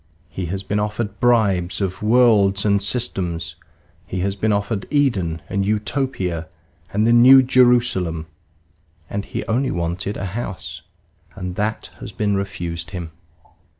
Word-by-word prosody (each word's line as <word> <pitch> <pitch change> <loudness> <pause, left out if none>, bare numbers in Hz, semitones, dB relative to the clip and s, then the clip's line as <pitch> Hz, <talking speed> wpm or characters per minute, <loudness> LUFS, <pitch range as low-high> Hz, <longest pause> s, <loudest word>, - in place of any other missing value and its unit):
He 90 -2 -5
has 95 +3 -4
been 105 +2 -1
offered 105 -1 -3
bribes 100 -7 +2
of 95 -2 -3
worlds 105 -4 +4
and 100 -1 +3
systems; 90 -7 -1 0.5
he 90 0 -3
has 100 +1 -1
been 110 +2 0
offered 100 0 -1
Eden 95 - 0
and 100 0 -1
Utopia 105 - -2 0.4
and 105 +2 +1
the 115 - +4
New 130 +3 +8
Jerusalem, 120 -11 +2 0.9
and 100 0 -3
he - - -5
only 125 +4 0
wanted 85 +4 -3
a 95 - -4
house; 95 -7 -5 0.5
and 90 -1 -5
that 105 +2 -2
has - - -7
been 105 -1 0
refused 85 -5 -4
him. 85 -2 -6
100 Hz, 140 wpm, -21 LUFS, 90-115 Hz, 0.9 s, New